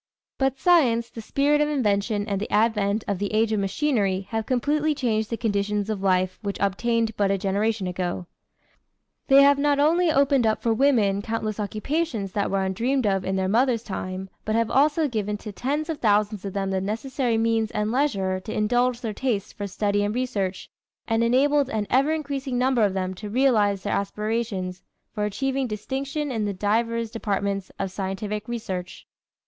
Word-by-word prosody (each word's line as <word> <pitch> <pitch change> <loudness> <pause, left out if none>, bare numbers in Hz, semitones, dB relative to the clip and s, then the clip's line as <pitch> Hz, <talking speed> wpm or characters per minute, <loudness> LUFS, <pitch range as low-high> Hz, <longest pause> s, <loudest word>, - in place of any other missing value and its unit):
But 270 -1 +1
science, 245 -9 +3
the 225 - -7
spirit 285 +6 +2
of 300 - +2
invention 210 -6 0
and 200 -2 -2
the - - -4
advent 210 -1 +2
of 200 -3 -1
the 205 0 -2
age 220 +1 +2
of 215 - +1
machinery 200 -2 0
have 225 -1 -2
completely 295 +4 +1
changed 220 -5 0
the 230 - -2
conditions 210 -1 -1
of 205 -3 -3
life 185 -1 +1
which 200 -2 -3
obtained 225 +3 0
but 200 -1 +2
a 195 - +2
generation 200 +2 0
ago. 180 0 -3 1.0
They 275 0 +7
have 280 0 +5
not 290 0 +2
only 325 +4 +3
opened 275 -4 +3
up 215 - +1
for 230 - +2
women 220 -6 +3
countless 220 -1 -3
occupations 215 - -2
that 200 +1 -1
were 195 0 0
undreamed 240 +7 0
of 195 -2 +1
in 190 +1 -1
their 190 -1 0
mother's 235 +2 +2
time, 190 -2 -5 0.2
but 215 - -1
have 230 -1 +1
also 300 +3 +3
given 210 -4 -2
to 210 0 -8
tens 290 +9 -2
of 320 -3 -4
thousands 210 -2 +1
of 195 - -4
them 195 -1 -2
the 190 -1 0
necessary 230 +4 -1
means 225 -1 +1
and 210 0 -1
leisure 200 -9 0
to 185 - -8
indulge 245 +3 +1
their 225 -4 -3
tastes 215 -4 -2
for 205 - -5
study 205 +1 0
and 205 +2 -1
research 205 -7 -2 0.4
and 225 +1 +2
enabled 275 +3 +3
an 215 -5 -1
ever 275 +4 +3
increasing 280 -4 -2
number 255 -1 +2
of 200 -2 +1
them 185 -1 -2
to 205 +3 -8
realize 210 -5 +2
their 205 - -1
aspirations 200 -3 -2 0.3
for 210 - -1
achieving 265 +5 -1
distinction 270 +7 -3
in 220 -4 -1
the 205 - -1
divers 230 +3 0
departments 200 -3 -2
of 195 -1 -3
scientific 205 +2 -4
research. 190 -7 -5
220 Hz, 185 wpm, -24 LUFS, 200-260 Hz, 1.0 s, They